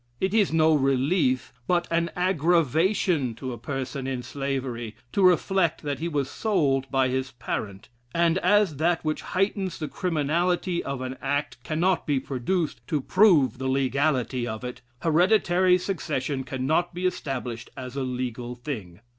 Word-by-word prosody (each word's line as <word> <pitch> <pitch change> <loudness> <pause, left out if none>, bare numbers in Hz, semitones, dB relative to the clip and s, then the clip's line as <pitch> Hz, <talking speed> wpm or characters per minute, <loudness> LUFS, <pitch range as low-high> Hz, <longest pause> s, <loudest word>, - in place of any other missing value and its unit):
It 190 +1 0
is 210 -6 +3
no 160 0 +4
relief, 135 0 +1
but 175 -1 +1
an 170 0 +1
aggravation 170 - +2
to 130 +1 -5
a - - -7
person 135 -1 -4
in 130 -2 -3
slavery, 130 -5 -4 0.2
to 200 - 0
reflect 180 -2 +3
that 145 -1 -2
he 165 - -2
was 145 -5 -1
sold 140 - 0
by 135 -1 +2
his 130 +1 -1
parent; 100 -5 -5 0.2
and 170 +3 +2
as 190 -4 +3
that 165 +2 +1
which 155 0 -1
heightens 195 0 -1
the 155 - -4
criminality 175 +1 0
of 140 -2 -4
an 130 0 -5
act 145 -4 -2
cannot 170 +5 0
be 145 -3 +2
produced 145 +7 -2
to 155 -4 0
prove 155 - +4
the 130 - -2
legality 130 -2 +1
of 110 +1 -5
it, 125 0 -6 0.2
hereditary 180 +2 +4
succession 145 -7 -2
cannot 155 +7 0
be 180 +1 -3
established 130 -9 -3
as 130 0 -7
a 140 - -2
legal 125 -1 -3
thing.... 110 - -7
145 Hz, 155 wpm, -26 LUFS, 130-175 Hz, 0.2 s, no